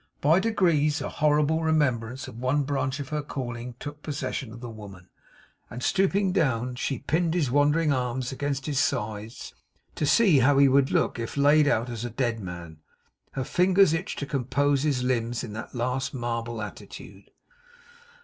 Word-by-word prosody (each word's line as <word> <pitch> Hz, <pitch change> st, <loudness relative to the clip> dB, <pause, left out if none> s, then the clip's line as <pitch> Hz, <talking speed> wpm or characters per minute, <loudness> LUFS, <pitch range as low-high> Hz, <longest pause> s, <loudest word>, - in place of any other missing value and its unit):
By 160 Hz, +5 st, +4 dB
degrees, 170 Hz, -9 st, +2 dB
a -, -, -4 dB
horrible 150 Hz, +1 st, +2 dB
remembrance 130 Hz, -6 st, 0 dB
of 115 Hz, -, -10 dB
one 130 Hz, +4 st, +1 dB
branch 135 Hz, 0 st, -2 dB
of 140 Hz, -1 st, -6 dB
her 150 Hz, -1 st, -2 dB
calling 120 Hz, -4 st, -6 dB
took 145 Hz, +1 st, -8 dB
possession 145 Hz, -5 st, -4 dB
of 115 Hz, -, -10 dB
the 120 Hz, -, -7 dB
woman; 100 Hz, -4 st, -12 dB, 0.6 s
and 125 Hz, +1 st, -7 dB
stooping 195 Hz, 0 st, +2 dB
down, 125 Hz, -, 0 dB
she 130 Hz, +2 st, -2 dB
pinned 165 Hz, +6 st, 0 dB
his 150 Hz, -8 st, 0 dB
wandering 145 Hz, +2 st, +3 dB
arms 125 Hz, 0 st, -2 dB
against 135 Hz, 0 st, -3 dB
his 145 Hz, -3 st, -1 dB
sides, 110 Hz, -5 st, -3 dB, 0.4 s
to 150 Hz, -, -1 dB
see 190 Hz, -, +5 dB
how 135 Hz, +3 st, +4 dB
he 140 Hz, 0 st, +7 dB
would 135 Hz, 0 st, +3 dB
look -, -, 0 dB
if 115 Hz, +4 st, -5 dB
laid 145 Hz, +1 st, +5 dB
out 120 Hz, -4 st, +1 dB
as 120 Hz, -2 st, -5 dB
a 120 Hz, -, -3 dB
dead 120 Hz, -1 st, -1 dB
man. 85 Hz, -5 st, -8 dB, 0.5 s
Her 135 Hz, -, -2 dB
fingers 185 Hz, +3 st, +3 dB
itched 170 Hz, +5 st, -3 dB
to 140 Hz, -, -3 dB
compose 140 Hz, +1 st, 0 dB
his 140 Hz, -4 st, 0 dB
limbs 120 Hz, -2 st, -1 dB
in 110 Hz, -4 st, -7 dB
that 110 Hz, +4 st, -7 dB
last 125 Hz, +3 st, -2 dB
marble 115 Hz, -2 st, -3 dB
attitude. 100 Hz, -, -10 dB
135 Hz, 170 wpm, -26 LUFS, 120-150 Hz, 0.6 s, he